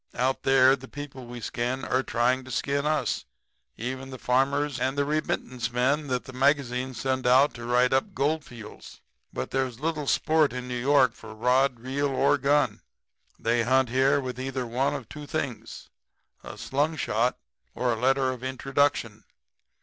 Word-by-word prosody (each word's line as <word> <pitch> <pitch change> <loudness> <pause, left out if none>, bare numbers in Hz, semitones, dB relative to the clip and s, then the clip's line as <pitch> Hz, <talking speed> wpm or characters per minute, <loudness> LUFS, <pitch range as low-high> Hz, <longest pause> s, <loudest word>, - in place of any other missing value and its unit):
Out 130 +2 0
there 135 0 +5
the 130 -1 -12
people 135 -3 -8
we 120 0 -7
skin 125 +4 -2
are 130 - +1
trying 125 +1 +1
to 130 - -12
skin 140 +4 -1
us, 150 -6 0 0.5
even 130 +3 -5
the 130 - -7
farmers 140 +3 +1
and 130 +2 -1
the 140 - +2
remittance 130 -5 -2
men 135 +5 +1
that 125 -2 -1
the 130 - -10
magazines 130 -2 0
send 130 -1 -1
out 130 +4 +5
to 120 0 -8
write 125 +1 +3
up 130 - 0
Goldfields. 135 -6 -4 0.3
But - - -5
there's 130 -3 -1
little 155 -1 -2
sport 155 -3 +2
in 125 0 -5
New 125 - -4
York 135 -1 +4
city 110 - -22
for 110 - -10
rod, 125 +2 +2
reel 140 +3 -1
or 140 +2 +2
gun. 140 -5 +2 0.6
They 115 +1 +1
hunt 130 +1 +2
here 135 +3 +3
with 130 -2 -5
either 130 -1 -3
one 125 +5 0
of 135 -6 -7
two 150 +3 -9
things 140 -6 -5 0.5
a - - -9
slungshot 135 -5 0 0.4
or 125 -1 +1
a 115 - -5
letter 135 0 +2
of 125 -1 -8
introduction. 130 -4 0
130 Hz, 170 wpm, -26 LUFS, 125-140 Hz, 0.6 s, there